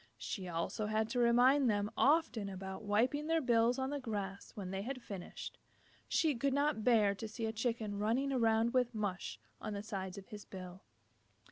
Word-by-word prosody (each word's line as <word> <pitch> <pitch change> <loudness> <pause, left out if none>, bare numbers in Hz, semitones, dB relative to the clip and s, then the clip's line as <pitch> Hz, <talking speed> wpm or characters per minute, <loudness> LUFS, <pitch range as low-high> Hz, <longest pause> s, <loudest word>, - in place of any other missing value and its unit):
She 190 -3 -4
also 170 +5 -2
had 215 +1 0
to 245 - -1
remind 245 +3 +5
them 205 -1 0
often 275 -9 +3
about 190 +1 -6
wiping 240 +8 +1
their 325 0 +3
bills 240 -2 +3
on 265 +1 -1
the 290 - -2
grass 200 -6 -4
when 190 -3 -5
they 195 0 -2
had 255 +5 -4
finished. 195 -6 -7 0.5
She 315 -3 +2
could 270 +2 0
not 285 -5 +1
bear 215 -4 +5
to 220 +3 -6
see 225 +1 -4
a 220 - 0
Chicken 225 -3 -2
running 250 +6 +1
around 230 -1 +3
with 250 -2 +2
mush 195 - -3 0.2
on 215 - -4
the 200 0 -4
sides 195 -3 -4
of 195 - -10
his 210 -1 -8
bill. 185 0 -9
220 Hz, 190 wpm, -35 LUFS, 200-250 Hz, 0.5 s, remind